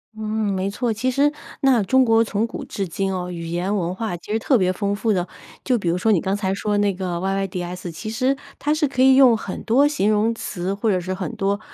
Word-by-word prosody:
嗯， 220 - -7 0.3
没 190 +1 -1
错， 235 +3 -1
其 255 +4 -1
实 285 +3 +3 0.3
那 255 -6 +4
中 260 +6 +4
国 225 -1 +4
从 215 +1 -1
古 - - -7
至 195 -2 -4
今 190 +3 -2
哦， 180 -1 -3
语 170 -1 -6
言 175 +4 -1
文 180 -2 -1
化 210 -2 -3
其 190 - -10
实 220 - +1
特 260 +2 +3
别 185 -2 +2
丰 200 +1 -1
富 220 +1 0
的。 180 -1 -1 0.4
就 250 -3 +2
比 185 - -4
如 175 - +1
说 220 +4 +2
你 185 - +4
刚 190 +1 -1
才 195 -2 -1
说 205 0 -1
那 205 -1 +2
个 180 -2 -3
YYDS， 180 -2 -3
其 215 +7 -7
实 255 +4 +1 0.2
它 295 +1 0
是 310 -2 +1
可 260 -1 -2
以 265 0 +7
用 255 -4 +6
很 195 - -6
多 265 +6 +4
形 215 -8 +1
容 215 +2 +2
词， 190 -3 -4
或 210 +2 -1
者 185 -2 +2
是 185 +1 -4
很 190 +5 -5
多， 200 0 0
205 Hz, 280 characters per minute, -22 LUFS, 185-230 Hz, 0.4 s, 以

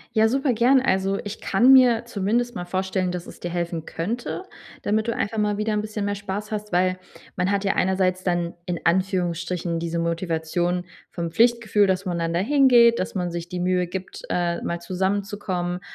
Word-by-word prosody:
Ja, 220 0 +5
super 270 +2 +1
gern. 250 +3 +4
Also, 195 -4 +1
ich 205 +1 -6
kann 240 +7 +4
mir 245 -3 +6
zumindest 235 +3 -1
mal 175 -4 -5
vorstellen, 185 0 -1
dass 180 -1 -5
es - - -12
dir 175 - -4
helfen 170 -2 -3
könnte, 235 - -4 0.4
damit 215 +2 0
du 230 - 0
einfach 210 +2 -2
mal 210 -1 +1
wieder 215 +1 -1
'n 210 - +1
bisschen 215 -1 -4
mehr 205 0 -1
Spaß 205 +1 -5
hast, 210 0 -4
weil 185 +1 +1 0.4
man 180 +2 +1
hat 200 0 0
ja 195 - +1
einerseits 185 0 +1
dann 175 -2 -1
in 175 -1 -2
Anführungsstrichen 175 -1 0
diese 170 0 -3
Motivation 170 +1 -1 0.3
vom 170 -1 -4
Pflichtgefühl, 225 -1 +3
dass 190 0 0
man 175 -3 -2
dann 165 0 -1
da 170 - +2
hingeht, 240 -1 +5
dass 185 - -3
man 180 -2 -1
sich 170 0 -5
die 180 0 -4
Mühe 180 0 +1
gibt, 185 +1 -7
äh, 170 -1 0
mal 170 0 -3
zusammenzukommen 190 -1 -2
190 Hz, 190 wpm, -24 LUFS, 175-215 Hz, 0.4 s, mir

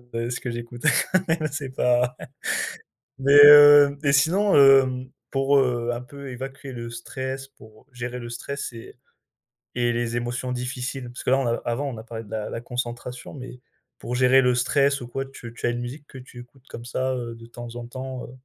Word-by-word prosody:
heu, 115 +1 -2
ce 120 - -3
que 125 - -5
j'écoute 120 0 -7 0.3
quand 185 -1 +1
même 160 -1 0
c'est 140 -2 -5
pas 125 0 +2 1.0
mais 140 +1 +3
heu 145 -1 +9
et 140 -1 +2
sinon, 185 +9 +3
hem, 135 -2 +5 0.2
pour, 135 +1 +2
heu, 120 -2 0
un 120 - -5
peu 140 +1 -10
évacuer 135 +2 -8
le 115 -1 -7
stress, 130 +3 -6
pour 110 -5 -19
gérer 125 0 -6
le 120 0 -8
stress 140 +3 -5
et 115 +1 -12 0.8
et 120 -1 +1
les 120 0 -2
émotions 125 +1 -3
difficiles? 125 +1 -4
Parce 120 - -9
que, - - 0
là, 135 - +4
on 135 - -1
a 115 - +1
avant 130 +4 -2
on 120 - -6
a 110 - -9
parlé 115 -1 -7
de 100 - -17
la 110 -1 -4
la 115 - -5
concentration 120 +1 -6
mais 125 -2 -9 0.4
pour 120 - -5
gérer 130 +1 +5
le 125 0 +3
stress 140 +2 +1
ou 120 - -8
quoi, 135 +2 -4
tu 120 -3 -11
tu - - -4
as - - +2
une 120 0 -3
musique 140 +5 -7
que 130 - -12
tu 125 -1 -13
écoutes 125 +2 -18
comme 115 - -9
ça, 130 +2 -2
heu, 120 -2 -5
de 115 0 -13
temps 120 0 -10
en 120 -1 -6
temps, 130 +1 -7
heu, - - -13
125 Hz, 210 wpm, -24 LUFS, 120-135 Hz, 1.0 s, heu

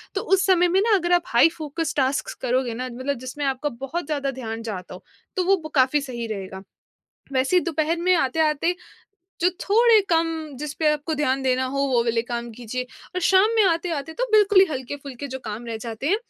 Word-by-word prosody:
तो - - 0
उस 385 -1 +2
समय 360 -2 +4
में 370 +2 +2
ना 440 -1 +4
अगर 350 -1 0
आप 350 -1 +4
हाइ 240 +8 +5
फ़ोकस 315 +1 -3
टास्क्स 270 +1 0
करोगे 250 -1 0
ना, 255 +2 -4
मतलब 260 +2 -3
जिसमें 280 +3 -4
आपका 270 +2 -1
बहुत 295 +5 -4
ज़्यादा 280 -3 -2
ध्यान 230 -3 -6
जाता 190 -6 -6
हो, 180 - -11 0.3
तो 370 - +1
वो 390 +1 +4
ब 310 - -5
काफ़ी 270 +2 +3
सही 240 -4 -5
रहेगा। 190 -3 -6 0.7
वैसे 270 +7 +2
ही - - +6
दोपहर 325 0 0
में 365 +1 +3
आते-आते, 310 +4 +1 0.7
जो 360 - +4
थोड़े 450 +2 +5
कम, 330 -1 +3 0.3
जिस 295 +1 -5
पे 315 - +1
आपको 300 +2 -2
ध्यान 270 -3 0
देना 260 0 +1
हो, 275 +2 -4
वो 245 -3 +2
वाले 230 -1 +1
काम 240 -1 -5
कीजिए 245 +2 -5 0.3
और 365 - -1
शाम 380 +4 +4
में 440 - +5
आते-आते 330 -4 -1
तो - - -1
बिल्कुल 415 -2 +5
ही - - +8
हल्के-फुल्के 275 0 -6
जो 265 - -5
काम 220 +2 -6
रह 230 - -4
जाते 225 +3 -6
हैं, 405 - +3
280 Hz, 210 wpm, -23 LUFS, 250-345 Hz, 0.7 s, ही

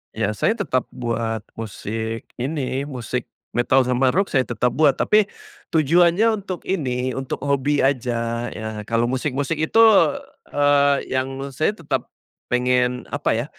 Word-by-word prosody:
Iya, 105 - 0
saya 105 - +1
tetap 130 - -1
buat 115 -3 -2 0.2
musik 110 +1 -5
ini 135 0 -2
musik 125 -2 -4 0.2
metal 130 +2 +3
sama 125 +1 +1
rock, 195 +2 +1
saya 130 -3 +2
tetap 120 0 0
buat. 145 -2 +3
Tapi, 215 0 +3 0.5
tujuannya 175 +8 +4
untuk 185 -3 -5
ini, 130 -8 -1
untuk 135 0 -4
hobi 140 +1 +1
aja 120 -3 0
ya. 110 -1 -6
Kalau 115 +1 +1
musik-musik 140 +3 -1
itu, 190 +9 +3 0.7
eee, 145 -1 +4
yang 135 +1 -2
saya 155 +9 0
tetap 165 -7 -3 0.4
pengen 125 0 +1
apa 145 -5 0
ya, 120 +3 -1
130 Hz, 135 wpm, -22 LUFS, 120-145 Hz, 0.7 s, tujuannya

